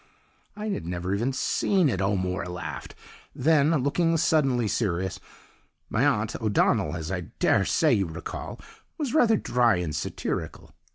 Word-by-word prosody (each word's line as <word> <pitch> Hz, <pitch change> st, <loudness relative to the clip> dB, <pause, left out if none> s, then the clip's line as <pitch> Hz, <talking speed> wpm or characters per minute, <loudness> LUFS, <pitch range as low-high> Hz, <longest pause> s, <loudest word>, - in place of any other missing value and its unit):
"I 215 Hz, +1 st, -4 dB
had 140 Hz, -, -3 dB
never 90 Hz, +2 st, -2 dB
even 115 Hz, +7 st, 0 dB
seen 180 Hz, +6 st, +1 dB
it!" 100 Hz, -8 st, -1 dB
O'Moore 95 Hz, -2 st, -1 dB
laughed 90 Hz, 0 st, -6 dB, 0.4 s
then, 150 Hz, 0 st, +3 dB
looking 165 Hz, +4 st, +2 dB
suddenly 140 Hz, -8 st, +2 dB
serious: 95 Hz, -4 st, -1 dB, 0.7 s
"My 115 Hz, -, +2 dB
aunt, 110 Hz, -6 st, 0 dB
O'Donnell, 110 Hz, -2 st, +2 dB
as 80 Hz, +1 st, -5 dB
I 90 Hz, -3 st, -3 dB
daresay -, -, +3 dB
you 95 Hz, -3 st, +1 dB
recollect, 80 Hz, +1 st, -7 dB, 0.3 s
was 285 Hz, -5 st, -2 dB
rather 235 Hz, -8 st, +4 dB
dry 120 Hz, -, +2 dB
and 85 Hz, -4 st, -3 dB
satirical. -, -, -4 dB
115 Hz, 135 wpm, -26 LUFS, -, 0.7 s, rather